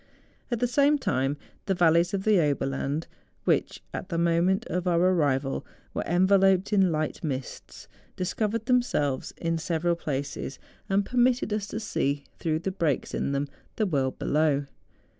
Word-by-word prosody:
At 240 -3 -1
the 245 - +2
same 280 +4 +4
time, 135 - 0 0.3
the 195 - +2
valleys 170 0 +4
of 195 -1 -2
the 210 -3 +4
Oberland, 140 0 0 0.4
which - - 0
at 185 - -5
the 170 - -2
moment 170 +3 +2
of 180 +2 -2
our 170 -1 +3
arrival 145 -7 +2 0.3
were - - -1
enveloped 190 +2 +4
in 190 -3 +4
light 155 +1 -2
mists, 135 -4 -5 0.3
discovered 215 +4 -1
themselves 240 - +1
in 165 -1 -1
several 170 +1 0
places, 145 -3 -4 0.3
and 195 +1 +2
permitted 245 -2 +2
us 210 -1 -2
to 220 - -4
see, 145 -9 -1 0.2
through 155 -2 0
the 190 - -2
breaks 165 -8 -1
in - - -1
them, 140 +1 -1 0.3
the 215 - +1
world 135 -8 0
below. 150 -2 +1
170 Hz, 155 wpm, -27 LUFS, 145-200 Hz, 0.4 s, same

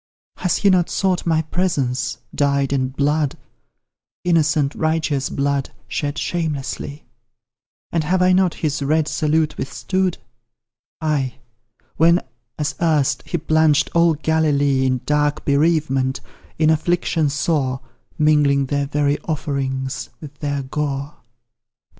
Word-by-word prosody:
Has 180 - 0
he 200 - +4
not 180 -2 +3
sought 185 -3 0
my 160 -1 +2
presence, 135 -8 -1 0.2
dyed 140 -1 +1
in 130 -2 +1
blood 145 +2 0 0.9
Innocent, 155 -4 +2
righteous 155 -3 0
blood, 140 -1 -1 0.2
shed 145 0 -3
shamelessly? 150 -3 -3 0.9
And 165 -2 0
have 185 +4 +1
I 180 0 +4
not 185 -2 +3
his 150 -2 -2
red 155 +2 +1
salute 155 -1 0
withstood? 185 +6 -1 0.8
Ay, 145 -5 0 0.6
when, 170 +2 +5 0.4
as 150 0 -1
erst, 155 -5 +2
he 175 - -1
plunged 155 -2 +2
all 170 -1 +4
Galilee 145 -4 +2
In 130 -1 0
dark 150 0 +1
bereavement 140 -3 +1 0.4
in 155 0 +4
affliction 160 -1 +1
sore, 140 -3 0 0.4
Mingling 145 -2 +3
their 140 +1 -1
very 145 0 +1
offerings 140 -3 -3
with 150 -2 -10
their 145 -2 -2
gore. 140 +1 -3
150 Hz, 115 wpm, -20 LUFS, 140-160 Hz, 0.9 s, when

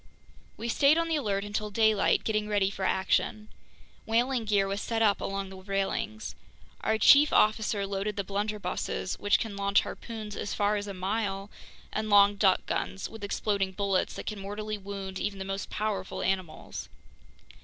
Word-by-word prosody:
We 230 - -4
stayed 280 +6 +4
on 335 0 +1
the 325 - +2
alert 205 -9 0
until 210 +1 -3
daylight, 220 -1 +3
getting 215 -1 0
ready 200 -2 +2
for 195 - -5
action. 210 +3 0 0.6
Whaling 240 +1 +1
gear 200 -2 +2
was 200 +1 -2
set 225 -1 0
up 205 -2 +3
along 195 0 -3
the 190 - -10
railings. 195 +3 -2 0.5
Our 220 0 +2
chief 285 +6 +7
officer 210 -1 +3
loaded 200 +1 -2
the 200 - -1
blunderbusses, 205 -1 -3
which 205 -1 +3
can 220 -3 -4
launch 200 0 +3
harpoons 215 -3 -7
as 205 - -3
far 205 +1 +2
as 205 0 -3
a 200 - -5
mile, 195 +1 -2 0.4
and 215 0 -2
long 205 0 +6
duck 195 -2 +3
guns 195 - -3
with 225 -2 -10
exploding 200 -1 -1
bullets 195 -1 0
that - - -6
can 215 -2 -4
mortally 210 +2 -4
wound 195 -1 -6
even 205 -1 -2
the 190 - -5
most 195 +1 -4
powerful 205 -3 -3
animals. 185 -4 -3
205 Hz, 170 wpm, -29 LUFS, 195-215 Hz, 0.6 s, chief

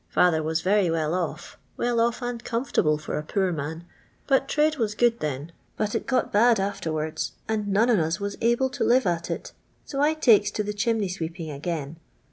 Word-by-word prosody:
Father 165 -3 +3
waa 160 +1 -3
very 195 -1 +3
weil 160 -1 0
off— 175 -1 -4 0.2
well 240 -1 0
off 235 +1 0
and 245 -1 -4
comfortable 230 - +1
for 150 - -4
a - - -5
poor 190 +3 0
man— 160 +2 -5 0.4
but 270 -1 +2
trade 305 +1 +2
was 215 -4 -1
good 235 0 +2
then. 150 +2 -4 0.3
But 210 -1 -1
ii - - 0
got 255 - -1
bad 230 +1 +5
afterwards, 160 -6 -2
and 215 -2 -1
none 215 +5 +3
on 215 - +4
ua 160 0 0
waa 200 0 -2
able 240 +3 +2
to - - -2
live 255 +2 +4
at 170 -2 -1
it; - - -4 0.3
so 275 -1 -3
I 305 +2 +3
takes 220 -9 +5
to 210 - +1
tke 210 0 -4
chimney 220 -1 +1
sweeping 165 -2 -5
again. 150 +1 -4
200 Hz, 200 wpm, -25 LUFS, 160-235 Hz, 0.4 s, bad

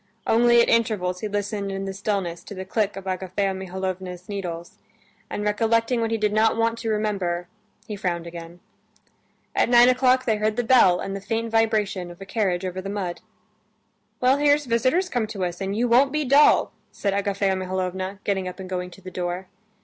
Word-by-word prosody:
Only 235 +1 +5
at - - -1
intervals 210 -6 +1
he 215 - -3
listened 205 -1 -3
in 195 0 -4
the 195 - -4
stillness 195 -4 -3
to 205 - -8
the 190 0 -6
click 210 +1 -1
of 195 - -8
Agafea 190 +1 -1
Mihalovna's 185 -1 -5
needles, 175 -5 -6 0.5
and 205 - -4
recollecting 230 +3 +1
what 225 - 0
he 225 - 0
did 210 -1 0
not 220 +1 +3
want 230 0 +1
to 230 - -3
remember, 195 -5 -1 0.4
he 210 - -4
frowned 175 -3 -2
again. 170 +1 -9 0.9
At - - +2
nine 240 0 +7
o'clock 255 0 +3
they 220 -3 +1
heard 215 0 0
the 245 - 0
bell 225 -7 +5
and 195 - -4
the 195 - -5
faint 225 +2 -2
vibration 215 -5 +1
of 175 - -12
a 195 - -8
carriage 190 -3 -1
over 185 0 -4
the 195 - -6
mud. 190 -4 -4 1.0
"Well, 255 +2 +4
here's 290 0 +3
visitors 255 +10 +1
come 245 -9 -1
to 200 -4 -3
us, 175 +1 -5
and 195 +2 -2
you 245 +2 +2
won't 255 +4 +4
be 305 0 -1
dull," 280 +3 +5 0.2
said 200 -1 -2
Agafea 200 -1 0
Mihalovna, 185 +1 -3
getting 190 -2 -1
up 180 0 -7
and 190 - -7
going 180 -1 -3
to 195 - -15
the 185 0 -9
door. 180 +1 -4
200 Hz, 195 wpm, -24 LUFS, 185-225 Hz, 1.0 s, nine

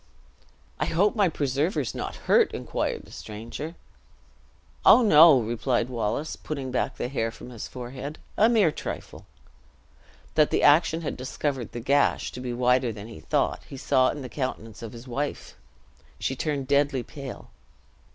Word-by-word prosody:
"I - - +1
hope 200 +7 +2
my 200 -4 +3
preserver 145 +3 0
is 130 - -2
not - - -5
hurt?" - - +4
inquired - - -3
the - - -16
stranger. 115 +10 -7 1.1
"Oh, 250 - +8
no!" 160 - +8
replied 120 +2 -1
Wallace, 120 +5 -2
putting 140 -4 -5
back 125 - -1
the - - -2
hair 115 -4 -1
from 120 +2 -11
his 115 -3 -7
forehead; 130 +4 -7 0.2
"a 220 +2 +5
mere 215 -9 +4
trifle!" - - -7 1.1
That 155 -1 +4
the - - +1
action 160 +2 +5
had 155 - -3
discovered 130 -1 -3
the 120 - -6
gash 140 +4 +2
to - - -8
be 125 -1 -4
wider 125 0 +2
than 105 +1 -9
he 115 - -10
thought, - - 0
he 135 - -9
saw 130 -1 +3
in 145 - -5
the - - -5
countenance 120 -5 -5
of 115 -2 -7
his 120 +2 -11
wife! 140 +4 -4 0.6
She 135 - -2
turned 140 -1 -2
deadly 140 -2 +2
pale. 135 -2 -9
135 Hz, 160 wpm, -26 LUFS, 120-150 Hz, 1.1 s, Oh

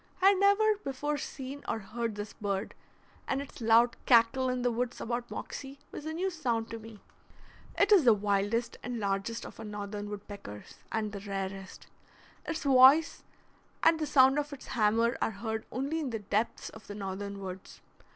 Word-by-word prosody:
I 380 +1 +7
had 395 -2 +3
never 410 +2 +4
before 290 +2 -2
seen 275 +1 -7
or - - 0
heard 220 +2 -4
this 205 0 -6
bird, 200 0 -3 0.5
and 270 - 0
its 280 -3 -9
loud 230 +1 +5
cackle 250 +2 +5
in 250 -1 -1
the 245 - +2
woods 245 +1 -2
about 240 +1 -3
Moxie 275 0 -7
was 300 - -7
a 315 - -3
new 375 +4 -1
sound 240 -9 -2
to 230 - -5
me. 220 -2 -12 0.8
It 405 +1 +3
is 390 -6 +7
the 235 -4 +6
wildest 205 +3 0
and 245 -1 -4
largest 200 +3 -2
of - - -11
our - - -6
northern 205 -1 -5
woodpeckers, 200 - -9
and 215 -1 -1
the 200 - -6
rarest. 195 -1 -6 0.6
Its 320 0 -3
voice 275 +4 +6 0.6
and 325 0 +5
the 305 - -1
sound 265 +1 +5
of 295 0 -3
its 285 - -9
hammer 230 +2 +2
are - - +2
heard 220 +1 -4
only 280 +6 -2
in 295 -4 -2
the 230 - -2
depths 210 +2 -2
of 220 -2 -14
the 205 - -7
northern 200 0 -5
woods. 190 -1 -8
230 Hz, 180 wpm, -30 LUFS, 205-275 Hz, 0.8 s, I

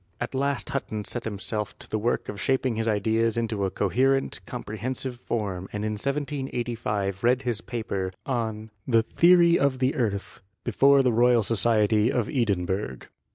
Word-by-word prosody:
At - - -4
last 140 +1 -1
Hutton 110 -6 -3
set 120 - -4
himself 105 0 -4
to - - -9
the 110 - -2
work 115 +3 0
of 105 0 -6
shaping 130 -2 +1
his 110 +1 -1
ideas 110 +2 +1
into 110 -4 -1
a - - 0
co 100 - -1
herent, 135 +6 +1
comprehensive 125 +4 -4
form 100 -6 -3
and 105 0 -3
in 110 - -1
1785 120 -6 -2
read 125 +2 +3
his 120 -3 -1
paper 100 -6 -3
on 110 -4 -3 0.2
the 115 -3 +4
"Theory 170 +7 +5
of 140 -2 +2
the 130 +1 +1
Earth" 105 -5 -2 0.2
before 140 0 +4
the 125 -2 +2
Royal 120 0 +4
Society 110 0 +2
of 120 -5 0
Edinburgh. 95 - -1
115 Hz, 160 wpm, -26 LUFS, 105-130 Hz, 0.2 s, Theory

